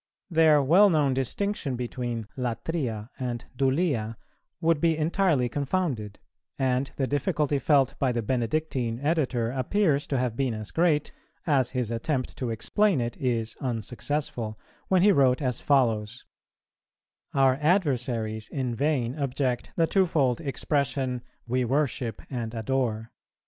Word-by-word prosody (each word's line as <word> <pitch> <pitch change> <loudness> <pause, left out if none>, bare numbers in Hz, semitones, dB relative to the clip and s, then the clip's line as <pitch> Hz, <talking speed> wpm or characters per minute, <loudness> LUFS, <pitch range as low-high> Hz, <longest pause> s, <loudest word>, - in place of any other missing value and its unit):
Their 155 -3 +5
well 185 +9 +6
known 150 -6 +2
distinction 135 - -1
between 120 -2 -4
latria 125 -2 -3
and 120 -2 -3
dulia 130 -4 0 0.4
would 165 -3 +2
be 165 -2 +3
entirely 160 -4 +2
confounded; 135 - -2 0.4
and 130 0 0
the 135 - 0
difficulty 145 0 0
felt 135 -2 +3
by 135 -3 +2
the 120 -1 -1
Benedictine 125 0 -1
editor 135 -6 0
appears 145 +3 +1
to 135 - 0
have 125 -2 -1
been 130 -3 0
as 110 -1 -6
great, 160 -3 +2 0.3
as 135 -6 +2
his 120 -3 -1
attempt 130 +3 -2
to 125 - -2
explain 185 - +1
it 120 -1 -2
is 115 -4 -1
unsuccessful, 120 -1 -3 0.3
when 185 -2 +3
he 205 - +7
wrote 135 -7 +4
as 125 -4 -2
follows: 115 -4 +1 1.1
'Our 135 -1 +4
adversaries 125 - 0
in 130 -4 -2
vain 130 -2 0
object 130 -2 -1
the 165 - +3
twofold 165 -8 +2
expression, 135 -3 -1 0.2
we 125 +2 0
worship 125 -3 -1
and 120 -3 -4
adore. 115 -1 -1
130 Hz, 130 wpm, -27 LUFS, 120-150 Hz, 1.1 s, he